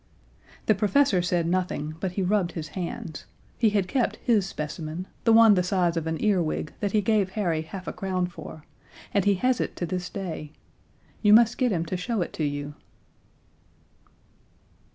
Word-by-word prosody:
The 215 - +5
professor 210 0 +3
said 175 -1 0
nothing, 170 -3 -1
but 185 -1 -3
he 195 - -1
rubbed 185 -2 +1
his 155 -3 -5
hands. 170 -2 -6 0.3
He 225 - +4
had 200 -3 0
kept 255 0 0
his 210 -6 +1
specimen 155 +1 -5 0.2
the 230 - +5
one 225 -1 +8
the 185 - +3
size 180 -2 +1
of 165 -1 -2
an 160 0 -2
earwig 180 -7 0
that 205 - -1
he 215 - +3
gave 200 -2 +1
Harry 170 -7 0
half 180 +4 -8
a - - -3
crown 185 -2 -1
for 165 -3 -9 0.5
and 200 -2 +2
he 200 -1 +4
has 250 +6 +1
it - - -3
to 175 - -3
this 180 +1 -3
day. 165 -6 -6 0.7
You 210 -1 +6
must 230 +1 +5
get 250 -3 +2
him 170 -3 0
to 180 +2 -3
show 205 +1 -1
it - - -9
to 155 - -3
you! 145 0 -3
185 Hz, 180 wpm, -26 LUFS, 165-210 Hz, 0.7 s, one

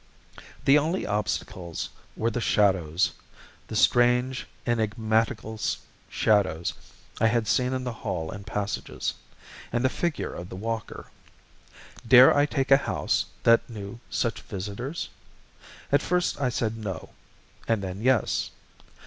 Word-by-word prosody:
The 140 +2 +7
only 165 +5 -1
obstacles 95 -4 -3 0.3
were 115 +1 +1
the 120 - -2
shadows 95 -6 +2 0.6
the 110 - -6
strange, 125 +3 +3 0.2
enigmatical 110 -1 0 0.5
shadows 95 -6 +2 0.5
I 115 - +4
had 115 -1 +1
seen 125 +4 +2
in 130 0 -2
the 125 -2 -3
hall 85 -6 -4
and 100 +1 -8
passages, 105 -1 -3 0.6
and 120 +2 0
the - - +5
figure 170 +2 -2
of 90 +1 -7
the - - -7
walker. 110 +2 -5 1.0
Dare 125 +1 +9
I 145 +1 +4
take 135 -2 -1
a 135 - +9
house 140 - 0 0.2
that 115 +1 +5
knew 105 0 -7
such 115 -3 -1
visitors? 105 - -5 0.8
At 140 - +4
first 180 -4 0
I 130 - +2
said 115 -2 -1
no, 95 -7 -5 0.6
and 115 -3 +1
then 95 +1 -5
yes. 125 -2 +2
115 Hz, 130 wpm, -26 LUFS, 100-125 Hz, 1.0 s, Dare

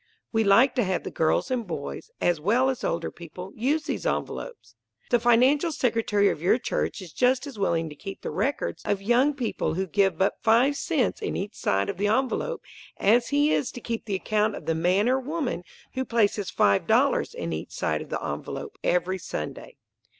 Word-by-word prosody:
We 225 -1 +2
like 225 +7 +5
to 245 - +4
have 190 -2 -1
the - - -5
girls 160 +11 +1
and 240 -5 -1
boys, 155 - -6
as 175 -3 +1
well 245 +9 +3
as 255 - -7
older 170 - -1
people, 180 +3 -9
use 285 +7 0
these - - -3
envelopes. - - -4 0.4
The 240 - +5
financial 255 +8 +4
secretary 225 -7 +1
of - - -3
your 180 +7 +4
church 235 -4 -2
is 170 -4 -12
just 255 +2 +2
as 270 -7 -9
willing 165 -4 +1
to 150 - -10
keep 195 +6 -8
the - - -3
records 280 +1 -2
of 200 - 0
young 250 +7 +3
people 245 -10 -2
who 190 +2 -1
give 195 -1 +1
but 190 +3 0
five 240 +5 +4
cents 280 - 0
in - - -2
each 200 +3 -4
side 100 0 0
of - - -4
the 205 +2 +1
envelope 265 - 0 0.3
as 235 +4 +3
he 290 +1 +3
is 265 - 0
to - - -7
keep 230 -2 -4
the 205 -3 -2
account 215 +2 0
of - - -9
the 165 - +1
man 180 +6 +2
or 260 +1 +3
woman 280 - -3 0.3
who 260 - -1
places 210 -5 +1
five 100 -1 +2
dollars - - +2
in 85 - -3
each 80 - -5
side 75 0 -1
of - - -9
the - - -3
envelope - - -5
every 185 +2 +1
Sunday. 75 - -6
220 Hz, 200 wpm, -26 LUFS, 185-260 Hz, 0.4 s, like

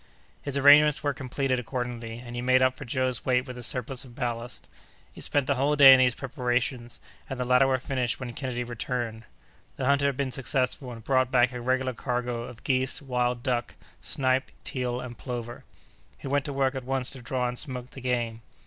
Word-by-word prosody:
His 140 -1 -2
arrangements 145 +1 +7
were 145 -1 +1
completed 130 0 -1
accordingly, 120 -2 -5
and 120 0 -9
he 120 - -3
made 130 +1 +4
up 130 0 +3
for 140 - -9
Joe's 130 0 -1
weight 125 0 +1
with 125 -2 -8
a 125 - -8
surplus 125 +2 -1
of 125 -3 -14
ballast. 120 -2 -4 0.5
He - - -11
spent 145 -2 +1
the 140 - +2
whole 140 +3 +1
day 140 -2 +10
in 130 - +6
these 125 -1 +3
preparations, 125 -2 -2 0.3
and 135 -2 -5
the - - +1
latter 125 +2 +4
were 130 -1 +2
finished 130 -1 -2
when 125 -2 -6
Kennedy 125 -1 -3
returned. 120 -1 -4 0.5
The 130 - -2
hunter 140 +1 +3
had 140 -2 -1
been 140 -2 -1
successful, 130 0 -1
and 115 -2 -10
brought 130 0 +2
back 125 -1 +3
a 125 -1 -6
regular 130 +1 0
cargo 120 0 -3
of 120 -2 -12
geese, 130 -1 +1
wild 125 -2 -1
duck, 125 -4 -1 0.2
snipe, 130 0 +1
teal, 125 -2 -3
and 125 -1 -7
plover. 120 -2 -6 0.5
He - - -13
went 140 0 0
to 145 - -3
work 135 -1 +1
at 130 -2 -5
once 130 0 -1
to 135 - -8
draw 125 0 -1
and 125 - -3
smoke 125 -4 -4
the 135 - -10
game. 120 -2 -1
125 Hz, 205 wpm, -27 LUFS, 120-135 Hz, 0.5 s, day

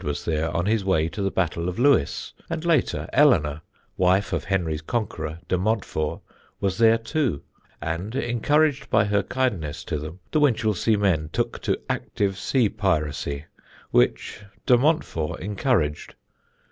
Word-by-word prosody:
was 75 -1 -3
there 80 0 0
on 85 - 0
his 110 0 +1
way 90 -5 +2
to 85 +4 -5
the 95 - +1
Battle 85 -2 -1
of 90 - -6
Lewes, 125 - +2 0.2
and 165 0 -3
later, 165 -6 +1
Eleanor, 80 - +4 0.4
wife 95 +2 +2
of - - -1
Henry's 85 -5 -1
conqueror, 80 -6 -3
de 90 - +1
Montfort, 95 -7 -1 0.4
was 95 0 -1
there 115 0 +6
too, 115 - -1 0.4
and 85 +8 -4
encouraged 140 +4 +1
by 110 -1 +4
her 100 -1 +2
kindness 100 - -2
to 75 - -3
them 80 +4 -8
the 155 - +2
Winchelsea 110 -6 +2
men 85 -7 +1
took - - -2
to - - 0
active 100 -2 -1
sea 125 -5 +2
piracy, 75 -7 -1 0.5
which - - +1 0.2
de 125 - +6
Montfort 125 - 0
encouraged. 95 - -1
95 Hz, 145 wpm, -24 LUFS, 80-115 Hz, 0.5 s, there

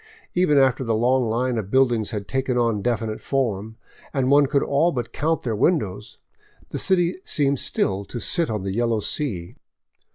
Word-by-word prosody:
Even 175 -5 +3
after 130 -1 +3
the 115 -2 0
long 125 +1 +2
Hne 120 +1 0
of 100 -3 -6
buildings 120 -4 +2
had 105 -3 -5
taken 130 -1 -1
on 115 -4 +1
definite 110 -1 -2
form, 110 -5 -2 0.4
and 135 -1 +1
one 145 0 +5
could 140 0 +1
all 150 +5 +2
but 125 -5 -4
count 160 +2 -1
their 115 -3 -1
windows, 105 - 0 0.5
the - - -4
city 180 -1 +2
seemed 140 -2 0
still 95 +1 -1
to 120 - -6
sit 165 - 0
on 105 -3 -3
the 95 -1 -3
yellow 115 0 +1
sea. 100 - -2
120 Hz, 175 wpm, -23 LUFS, 110-140 Hz, 0.5 s, one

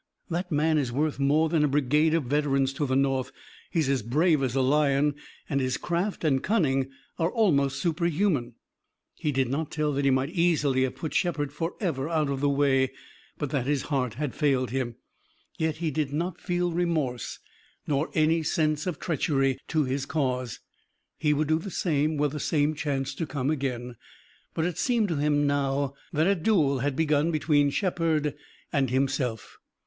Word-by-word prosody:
That 175 +2 -2
man 155 +1 +2
is 130 -4 -1
worth 145 +3 -1
more 150 +4 +3
than 160 -1 +2
a - - +4
brigade 150 +3 +2
of 165 - +1
veterans 135 0 +1
to 145 +1 -1
the 130 - 0
North. 135 -1 +1 0.4
He's 160 -5 0
as 135 -2 +1
brave 150 - +2
as 130 -2 -1
a 135 - +3
lion, 145 +1 +3 0.3
and 140 -1 0
his 130 0 0
craft 175 +4 -2
and 135 -4 +2
cunning 135 - +1 0.3
are 165 0 +2
almost 140 - +2
superhuman." 165 - 0 0.6
He 150 - -2
did 135 -2 +1
not 145 +4 -2
tell 150 -2 -1
that 140 +1 -1
he 140 - +4
might 130 +3 +1
easily 155 -7 +2
have 130 - -5
put 160 - -5
Shepard 145 -5 0
forever 165 - -2
out 155 -4 +1
of 135 - -2
the 145 +1 +2
way, 135 -2 +2 0.5
but 145 -3 -3
that 135 -3 -1
his 145 -2 +1
heart 130 -6 -1
had 145 -1 -3
failed 135 -5 +1
him. 125 -3 -2 0.6
Yet 160 -1 0
he 160 -1 -1
did 145 -1 -1
not 170 +4 -3
feel 175 0 0
remorse 160 -8 -1 0.5
nor 145 +1 0
any 160 +1 +3
sense 155 0 0
of 175 -5 -2
treachery 135 -5 0
to 155 -2 +1
his 135 +1 -2
cause. 130 -6 -2 0.6
He 150 -2 +2
would 150 +1 +1
do 160 +1 +2
the 195 - -6
same 155 -4 0
were 145 +1 +2
the 150 +2 -5
same 150 +1 +1
chance 140 -3 -2
to 165 - -4
come 140 0 -1
again. 125 -5 -3 0.6
But 160 - 0
it 180 -1 -3
seemed 230 -4 +1
to 165 - -1
him 145 0 +2
now 140 -1 0 0.2
that 155 +1 +2
a 195 - +4
duel 160 -7 +2
had 140 +1 -1
begun 150 +1 +2
between 150 -3 +2
Shepard 160 -3 0 0.4
and 135 -3 +2
himself. 130 -3 -1
145 Hz, 185 wpm, -27 LUFS, 135-160 Hz, 0.6 s, a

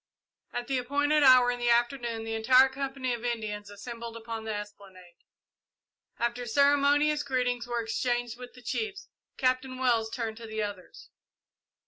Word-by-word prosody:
At 245 0 -4
the 265 0 0
appointed 290 +4 +1
hour 255 -3 +7
in 245 - -4
the 240 0 +1
afternoon 235 -1 +1
the 225 0 -4
entire 255 +4 +5
company 265 -1 -3
of 235 -1 -5
Indians 215 -4 -3
assembled 230 +3 -8
upon 225 -1 -6
the 220 - -2
esplanade. 195 -4 -10 1.0
After 240 +1 -2
ceremonious 285 +3 +3
greetings 250 -3 -1
were 240 -1 -2
exchanged 240 +1 -1
with 250 0 -11
the 250 - -15
chiefs, 405 - -4 0.3
Captain 255 0 0
Wells 235 -4 +1
turned 225 -2 -4
to 230 -1 -9
the 220 0 -2
others. 205 -3 -8
240 Hz, 150 wpm, -28 LUFS, 225-260 Hz, 1.0 s, hour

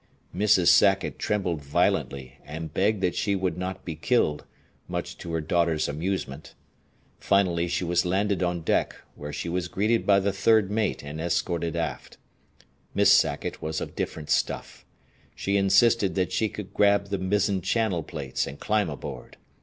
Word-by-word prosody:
Mrs. 95 -3 +4
Sackett 95 +3 +4
trembled 95 -7 -1
violently 70 -1 -1
and 80 +1 -7
begged 100 +1 +1
that 90 -2 +1
she 100 -2 0
would 95 -1 -1
not 95 +1 -5
be 85 - -4
killed, 80 - 0 0.4
much - - -4
to 85 - -7
her 80 -1 -1
daughter's 80 -1 +1
amusement. 75 -2 -4 0.6
Finally 90 -4 +2
she 90 +1 -1
was 90 0 +1
landed 95 +2 0
on 90 -1 -1
deck, - - +1 0.2
where 75 0 -8
she 85 - -5
was 90 +1 -2
greeted 105 +6 0
by 100 -1 +6
the 100 0 0
third 105 0 +3
mate 105 -6 -1
and 75 +2 -6
escorted 85 -1 -1
aft. - - -4 0.8
Miss - - +5
Sackett - - +2
was 80 0 -3
of - - -7
different 75 -2 -4
stuff. - - -2 0.5
She 100 - -1
insisted 100 +1 +3
that 95 -2 0
she 110 - 0
could 100 -2 -8
grab 100 -1 +3
the 100 -1 -2
mizzen 95 0 +1
channel 105 -3 0
plates 65 -3 -4
and 70 - -8
climb 105 -4 0
aboard. 70 - -8
90 Hz, 160 wpm, -26 LUFS, 80-100 Hz, 0.8 s, by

